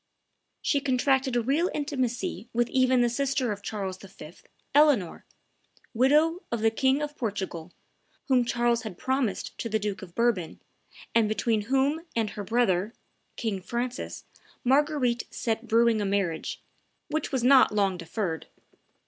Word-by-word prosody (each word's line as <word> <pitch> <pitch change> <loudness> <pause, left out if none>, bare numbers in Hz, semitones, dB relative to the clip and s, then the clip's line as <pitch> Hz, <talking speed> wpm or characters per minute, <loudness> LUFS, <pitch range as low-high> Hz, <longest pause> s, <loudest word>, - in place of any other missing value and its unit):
She 285 - +2
contracted 265 -1 +1
a 240 - +2
real 295 +9 +1
intimacy 250 -7 -2
with 240 0 +1
even 255 -1 +3
the 240 - +4
sister 260 -1 0
of 205 -1 -5
Charles 195 -3 -4
V., 180 -5 -12 0.4
Eleanor, 280 - +3 0.7
widow 300 +8 +3
of 235 -2 -1
the 225 0 +3
King 265 +5 +2
of 295 0 -5
Portugal, 190 - -4 0.6
whom 255 -3 +4
Charles 240 0 +1
had 215 -6 -7
promised 260 -5 -1
to 230 - -3
the 220 - +1
Duke 205 -3 -3
of 175 -3 -11
Bourbon, 230 -8 0 0.5
and 225 -2 +3
between 220 0 +1
whom 275 +4 +2
and 220 -3 0
her 210 -2 -6
brother, 215 -1 +1 0.4
King 210 -5 -3
Francis, 240 +5 -4 0.4
Marguerite 265 -2 +2
set 225 0 -3
brewing 230 -1 +3
a - - -1
marriage, 195 -5 -2 0.5
which 310 0 -2
was 260 -3 -1
not 260 +1 +6
long 200 -3 +1
deferred. 170 0 -4
235 Hz, 145 wpm, -27 LUFS, 205-265 Hz, 0.7 s, not